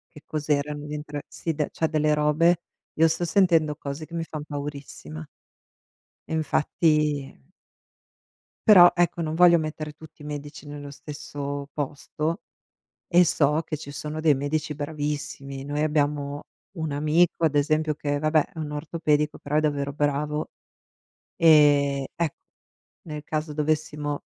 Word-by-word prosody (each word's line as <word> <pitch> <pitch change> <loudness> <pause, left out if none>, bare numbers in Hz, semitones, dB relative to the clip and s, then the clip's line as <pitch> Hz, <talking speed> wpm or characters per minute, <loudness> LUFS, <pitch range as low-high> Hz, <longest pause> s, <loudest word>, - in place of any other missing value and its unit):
Che 150 - -12
cos'erano 150 -1 -2
gli 150 - -5
entr 150 -1 -5
sì, 165 - -3
de 150 -1 -1
cioè, 160 - 0
delle 155 -1 +2
robe, 155 +3 +3 0.3
io 165 +1 +5
sto 165 +2 -1
sentendo 165 -4 +3
cose 145 +1 -6
che 170 - -12
mi 165 -1 -2
fan 155 -2 -6
paurissima. 140 - -7 1.0
E - - -6
infatti 150 -2 +1 1.3
Però, 180 -4 +9
ecco, 175 -1 +1
non 155 0 -2
voglio 175 0 +7
mettere 155 -1 -4
tutti 160 -1 -15
i 150 - -9
medici 145 0 -7
nello 145 -1 -8
stesso 145 -1 -6
posto 150 +4 -3 0.7
e 175 0 +5
so 150 0 +2
che 155 - -3
ci 140 -1 -8
sono 150 +2 -5
dei 155 -2 +5
medici 150 +3 -2
bravissimi. 145 -2 -4
Noi 145 +1 -2
abbiamo 145 -1 0 0.3
un 160 -3 -2
amico 160 +3 +2
ad 150 -2 +3
esempio, 155 +1 +2
che 145 -1 -2
vabbè, 155 0 +2
è - - -16
un 150 -2 -4
ortopedico 150 0 0
però 150 +1 -2
è - - +6
davvero 145 -2 0
bravo, 150 +1 -1 0.9
ehm, 145 -4 +5
ecco, 165 -3 -1 0.7
nel 150 -2 -7
caso 155 0 -3
dovessimo 150 -1 -1
150 Hz, 145 wpm, -25 LUFS, 145-155 Hz, 1.3 s, Però